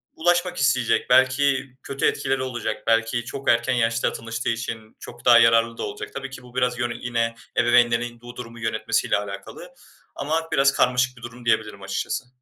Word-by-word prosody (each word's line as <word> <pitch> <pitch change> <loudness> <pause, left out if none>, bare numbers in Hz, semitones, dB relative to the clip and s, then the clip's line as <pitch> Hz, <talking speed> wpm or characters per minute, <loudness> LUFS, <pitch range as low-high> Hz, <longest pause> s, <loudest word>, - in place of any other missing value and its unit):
ulaşmak 175 +2 +1
isteyecek. 130 -3 +1
Belki 130 +1 +3
kötü 135 - -2
etkileri 135 0 0
olacak. 125 -3 -4
Belki 115 +1 +1
çok 135 +2 -4
erken 120 +2 +3
yaşta 115 -1 +1
tanıştığı 115 +1 -4
için 115 -1 -5
çok 120 0 -12
daha 120 -1 +8
yararlı 115 0 +4
da - - -4
olacak. - - -6
Tabii 135 0 -5
ki 135 -2 -10
bu 125 0 -16
biraz 125 -1 0
yön 120 -1 -1
yine 115 -1 -1 0.2
ebeveynlerin 120 -1 +3
bu 120 0 -11
durumu 115 -1 -9
yönetmesiyle 115 0 0
alakalı. 105 - -8 0.4
Ama 160 +3 -2
biraz 140 -1 +4
karmaşık 125 +1 +2
bir - - -14
durum 120 +1 -10
diyebilirim 110 -3 0
açıkçası. 95 +6 -3
120 Hz, 170 wpm, -23 LUFS, 115-130 Hz, 0.4 s, daha